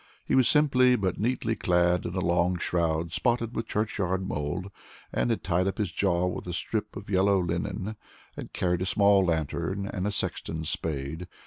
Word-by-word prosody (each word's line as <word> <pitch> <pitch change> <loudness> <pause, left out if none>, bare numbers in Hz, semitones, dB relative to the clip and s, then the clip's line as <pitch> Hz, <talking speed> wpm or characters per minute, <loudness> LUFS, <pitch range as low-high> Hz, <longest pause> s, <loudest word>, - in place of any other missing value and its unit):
He - - -2
was 130 -2 +5
simply 130 -4 +4
but 95 -5 -1
neatly 115 0 0
clad 90 -1 +2
in 85 - -5
a 95 - 0
long 85 +1 +2
shroud, 85 -1 0
spotted 120 +2 0
with 115 - -3
churchyard 95 -3 -1
mold, 85 +7 -3 0.4
had 115 -2 0
tied 90 +1 +1
up 95 - -2
his 105 -5 -1
jaw 90 -1 +1
with 90 0 -3
a 90 - -3
strip 105 +5 -3
of 100 - -9
yellow 95 +1 +4
linen, 95 +4 -2 0.4
and - - -8
carried 90 -1 0
a - - 0
small 100 0 +4
lantern 85 +3 -1
and 95 0 -3
a - - 0
sexton's 80 -5 -2
spade. 80 +2 -2
95 Hz, 180 wpm, -27 LUFS, 85-105 Hz, 0.4 s, was